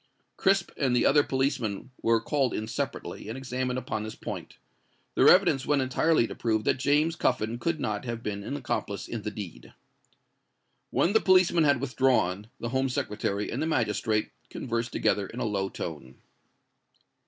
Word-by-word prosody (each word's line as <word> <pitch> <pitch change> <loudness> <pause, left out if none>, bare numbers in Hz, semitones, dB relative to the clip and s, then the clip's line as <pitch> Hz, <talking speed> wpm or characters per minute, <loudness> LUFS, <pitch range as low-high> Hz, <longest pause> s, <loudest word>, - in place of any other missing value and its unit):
Crisp 195 -2 +2
and 130 -3 +1
the 120 - +3
other 145 +1 +6
policeman 130 -5 -1
were 115 0 +3
called 135 +2 0
in 110 - -3
separately, 110 - -4
and 115 - -5
examined 130 -1 -2
upon 110 -4 -3
this 110 0 -6
point. - - -7 0.6
Their - - +6
evidence 135 - +5
went 145 -2 +3
entirely 135 +1 +2
to - - -6
prove 110 -2 0
that - - +1
James 150 +4 +2
Cuffin 120 -6 0
could 165 +4 -1
not 105 -3 -2
have 115 -1 -4
been 100 -1 -3
an 140 - -4
accomplice 110 -6 -3
in 115 - -4
the 105 - -3
deed. 90 - -9 1.1
When 175 - +2
the 220 - +5
policemen 180 -3 +4
had 140 -3 +4
withdrawn, 125 -7 +1
the 120 - -3
Home 130 +1 0
Secretary 105 -3 -2
and - - -2
the 160 - 0
magistrate 110 -6 0 0.2
conversed 115 -1 -3
together 105 -2 +1
in 120 - -8
a - - -1
low 100 -2 -1
tone. 70 -9 -7
120 Hz, 170 wpm, -28 LUFS, 105-140 Hz, 1.1 s, other